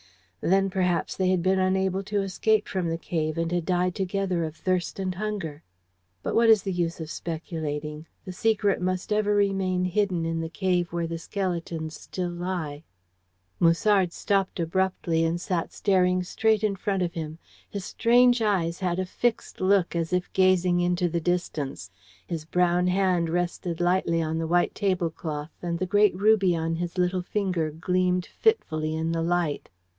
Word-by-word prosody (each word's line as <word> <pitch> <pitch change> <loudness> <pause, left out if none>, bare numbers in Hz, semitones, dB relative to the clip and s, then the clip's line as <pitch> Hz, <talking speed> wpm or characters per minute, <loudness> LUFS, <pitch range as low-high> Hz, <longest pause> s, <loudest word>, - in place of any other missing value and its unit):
Then, 195 +2 +3
perhaps, 180 -2 0
they 185 -1 +1
had 185 -2 +1
been 190 +1 +2
unable 190 0 +1
to 205 -1 0
escape 210 +2 +1
from 180 -3 -2
the 165 - -1
cave, 155 -2 -2
and 165 0 -1
had 175 -1 0
died 180 -1 +1
together 190 -2 -1
of 155 -1 -4
thirst 180 +2 -1
and 190 -1 -2
hunger. 185 -6 -4 0.6
But - - -2
what 230 0 +4
is 220 -3 +6
the 195 - -2
use 170 -1 -1
of 160 -1 -6
speculating? 155 -2 -5 0.2
The 185 - -5
secret 205 +1 +1
must 185 +3 -1
ever 210 -1 +2
remain 195 -2 +1
hidden 185 -2 0
in 165 0 -1
the 160 - -4
cave 180 -1 0
where 170 0 -1
the 165 0 -4
skeletons 170 -4 -3
still 180 -2 -4
lie." 175 -4 -4 0.8
Musard 180 +2 +3
stopped 195 +1 -1
abruptly, 170 -1 0
and 165 +1 0
sat 180 -2 -2
staring 185 -2 +2
straight 220 +3 +1
in 210 -2 +1
front 195 -1 -1
of 170 -1 -2
him. 160 -2 -5 0.3
His 200 -2 -5
strange 245 +1 +4
eyes 180 -6 +1
had 180 -2 -1
a 185 - -1
fixed 230 +4 -2
look, 185 -2 +2
as 165 -1 -1
if 180 0 -1
gazing 185 -2 +3
into 175 0 +1
the 170 0 -1
distance. 155 - -2 0.3
His 160 -3 -5
brown 180 +1 +2
hand 180 -2 +2
rested 175 0 -2
lightly 175 -2 +2
on 160 +1 -2
the 165 - -2
white 175 +1 +2
tablecloth, 165 -6 -2
and 170 -1 -2
the 185 - -1
great 205 0 +3
ruby 195 -2 +4
on 165 0 -1
his 175 +1 -4
little 180 0 +1
finger 180 -4 -1
gleamed 180 +3 0
fitfully 155 - 0
in 160 +1 -1
the 165 0 -1
light. 170 -3 -1
180 Hz, 170 wpm, -26 LUFS, 165-190 Hz, 0.8 s, is